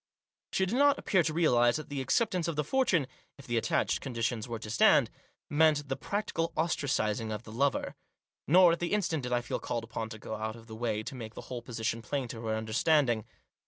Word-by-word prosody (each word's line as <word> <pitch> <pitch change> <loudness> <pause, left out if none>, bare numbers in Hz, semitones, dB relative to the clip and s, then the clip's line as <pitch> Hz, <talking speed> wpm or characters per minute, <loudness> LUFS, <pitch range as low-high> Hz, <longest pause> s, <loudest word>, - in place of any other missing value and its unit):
She 190 - +1
did 190 - -3
not 285 0 +5
appear 190 - +2
to 160 -1 0
realise 120 -7 +3
that 155 - -5
the 140 -2 -3
accept 210 - +1
ance 175 -2 -1
of 165 - -2
the 150 - 0
fortune, 210 - +2 0.3
if 140 - -13
the 120 - -2
attached 115 - +1
conditions 115 -3 -2
were 115 -1 -4
to 110 -1 -8
stand, 115 - +5 0.4
meant 150 -1 +3
the 135 - 0
practical 170 -4 -2
ostracising 120 -9 0
of 105 +1 -4
the 110 - -11
lover. 135 +4 0 0.5
Nor, 180 +3 +7
at 170 - 0
the 175 +3 -2
instant, 170 -7 0
did 125 -1 -5
I 120 0 +2
feel 120 - -3
called 120 -1 -3
upon 115 0 -5
to 110 - -8
go 110 - -7
out 110 0 -3
of 115 -1 -13
the 110 -1 -9
way 110 -2 -2
to 140 - -6
make 115 -3 -8
the - - -7
whole 125 -2 -6
position 115 -1 -3
plain 135 +2 -3
to 115 - -7
her 110 - 0
under 110 0 -4
standing. 125 -5 +3
125 Hz, 230 wpm, -30 LUFS, 115-160 Hz, 0.5 s, Nor